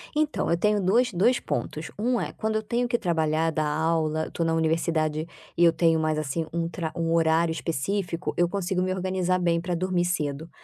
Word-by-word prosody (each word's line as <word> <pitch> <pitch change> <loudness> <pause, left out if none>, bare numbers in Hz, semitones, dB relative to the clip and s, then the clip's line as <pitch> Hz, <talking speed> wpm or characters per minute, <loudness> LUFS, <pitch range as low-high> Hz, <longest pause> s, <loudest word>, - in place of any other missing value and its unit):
então, 305 0 0
eu 170 - +2
tenho 210 +3 +2
dois 235 +7 +3
dois 210 +8 +3
pontos, 155 0 -4
um 240 +2 +1
é: - - -4
quando 220 0 -2
eu 220 - 0
tenho 240 +3 0
que 240 0 +1
trabalhar, 160 -3 +1
dar 155 -1 0
aula, 160 0 0
eu - - -9
tô 170 - -2
na 165 0 +1
universidade 160 -1 0 0.3
e 170 - +4
eu 170 - +7
tenho 165 -1 +3
mais, 155 -1 0
assim, 155 +2 -2
um 170 0 -1
tra 165 -2 -4
um 165 -1 0
horário 165 0 +3
específico, 170 +3 -2
eu 175 0 +3
consigo 190 -1 -1
me 185 0 0
organizar 185 -1 0
bem 170 -1 +1
pra 175 0 -2
dormir 180 0 0
cedo. 155 -3 -2
170 Hz, 210 wpm, -26 LUFS, 160-185 Hz, 0.3 s, eu